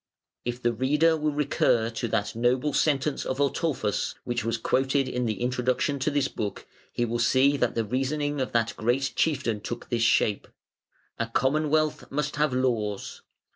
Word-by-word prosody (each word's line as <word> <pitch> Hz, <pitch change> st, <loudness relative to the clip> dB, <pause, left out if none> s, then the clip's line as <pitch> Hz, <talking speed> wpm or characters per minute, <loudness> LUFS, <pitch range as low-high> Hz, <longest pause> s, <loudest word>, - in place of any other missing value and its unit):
If 120 Hz, 0 st, -3 dB
the 120 Hz, 0 st, +2 dB
reader 150 Hz, +7 st, +3 dB
will 155 Hz, -1 st, 0 dB
recur 130 Hz, -5 st, +1 dB
to 115 Hz, +1 st, -3 dB
that 110 Hz, -2 st, -1 dB
noble 125 Hz, +5 st, +1 dB
sentence 145 Hz, -1 st, +1 dB
of 130 Hz, -, -3 dB
Ataulfus, 140 Hz, -6 st, 0 dB
which 120 Hz, 0 st, -2 dB
was 115 Hz, 0 st, -1 dB
quoted 135 Hz, +3 st, +1 dB
in 125 Hz, -1 st, -1 dB
the 110 Hz, -3 st, -2 dB
introduction 130 Hz, +4 st, 0 dB
to 130 Hz, -, +1 dB
this 145 Hz, -2 st, +1 dB
book, 105 Hz, -5 st, -5 dB, 0.3 s
he 120 Hz, -, 0 dB
will 120 Hz, +1 st, -2 dB
see 130 Hz, +4 st, +4 dB
that 125 Hz, -3 st, 0 dB
the 115 Hz, -, 0 dB
reasoning 145 Hz, +4 st, -1 dB
of 130 Hz, -, -2 dB
that 115 Hz, -1 st, +1 dB
great 125 Hz, +3 st, 0 dB
chieftain 130 Hz, -9 st, 0 dB
took 120 Hz, -, -6 dB
this 120 Hz, -1 st, 0 dB
shape: 105 Hz, -2 st, +2 dB, 0.7 s
"A 115 Hz, -, 0 dB
Commonwealth 150 Hz, +5 st, +1 dB
must 150 Hz, +1 st, -2 dB
have 150 Hz, -1 st, +2 dB
laws. 115 Hz, -6 st, -1 dB
130 Hz, 170 wpm, -26 LUFS, 115-145 Hz, 0.7 s, see